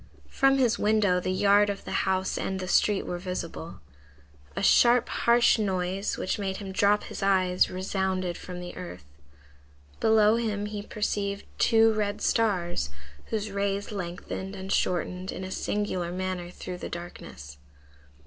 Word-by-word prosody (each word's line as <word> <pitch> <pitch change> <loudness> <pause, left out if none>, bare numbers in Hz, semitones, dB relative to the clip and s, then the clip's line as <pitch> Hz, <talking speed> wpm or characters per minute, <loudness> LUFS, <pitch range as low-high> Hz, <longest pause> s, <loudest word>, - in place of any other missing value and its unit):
From 270 0 +3
his 245 -4 +2
window 210 -4 +3
the 180 - -3
yard 200 +2 +4
of 200 -1 -4
the - - -6 0.2
house 190 0 0
and 190 0 -2
the 185 - -4
street 205 +2 +2
were 175 - -4
visible. 175 -2 -6 0.7
A - - -2
sharp, 240 +4 +5
harsh 235 -1 +3
noise, 190 -1 -1
which 185 - -2
made 190 -1 -2
him 195 -2 -6
drop 205 +2 +3
his - - -7
eyes, 185 -2 +3
resounded 185 -1 -2
from 180 +1 -8
the 175 0 -8
earth. 180 - -8 0.9
Below 220 0 +4
him 210 -3 -1
he 210 0 -5
perceived 205 -1 -2
two 225 0 +5
red 210 -1 -1
stars, 180 - 0 0.4
whose 215 -2 -3
rays 200 +1 -2
lengthened 190 0 -5
and 190 0 -6
shortened 180 +1 -1
in 190 - -6
a 185 - -6
singular 185 -4 -2
manner 185 -1 -3
through 180 0 -7
the - - -6
darkness. 70 - -9
195 Hz, 150 wpm, -27 LUFS, 180-210 Hz, 0.9 s, sharp